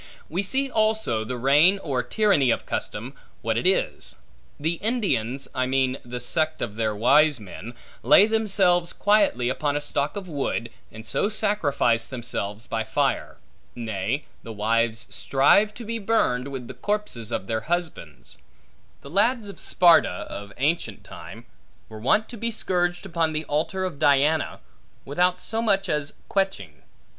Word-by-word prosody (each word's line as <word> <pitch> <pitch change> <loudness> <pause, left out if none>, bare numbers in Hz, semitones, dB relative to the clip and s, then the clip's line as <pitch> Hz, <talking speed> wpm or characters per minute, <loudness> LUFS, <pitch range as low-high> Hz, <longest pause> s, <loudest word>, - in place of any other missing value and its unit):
We 175 +5 -1
see 265 +8 -1
also 220 - 0
the 125 +3 -5
reign 145 +10 +5
or 140 -9 -2
tyranny 195 - +2
of - - 0
custom, - - -4 0.3
what - - 0
it - - +1
is. - - 0 0.4
The 160 +3 -1
Indians 165 - -1
(I 130 0 0
mean 130 0 +1
the 125 0 -6
sect 155 +5 -1
of 110 - -3
their 110 -1 -1
wise 145 +5 +4
men) 105 +3 -9 0.3
lay 200 - +7
themselves 195 -6 +2
quietly 200 - +2
upon 145 +3 -1
a - - 0
stock 145 +1 -2
of 200 -2 -6
wood, 135 -6 -3 0.2
and 110 +1 -11
so 200 - 0
sacrifice 145 - +1
themselves 115 -4 -5
by 115 -1 -2
fire. 110 - -1 0.4
Nay, 115 +3 -3 0.2
the 115 - -9
wives 115 +2 0
strive 170 +10 +3
to 235 - -8
be 230 +1 -3
burned, 195 - +1
with 135 -3 -6
the - - -7
corpses 205 - -3
of 95 - -2
their 110 +2 -2
husbands. 160 - -5 0.6
The 140 - -11
lads 220 +3 +1
of 200 - -10
Sparta, 165 - +4
of 100 0 -7
ancient 140 - -1
time, - - -11 0.4
were 110 -1 -9
wont 205 - +2
to 240 - -8
be 230 +2 -1
scourged 175 -5 -1
upon 165 -3 0
the 155 0 -2
altar 160 +6 -1
of 170 -6 -5
Diana, 145 +1 +2 0.4
without 180 +5 +1
so 225 +1 -2
much 195 -3 +2
as 150 -3 -2
queching. 100 - -2
150 Hz, 155 wpm, -24 LUFS, 120-195 Hz, 0.6 s, lay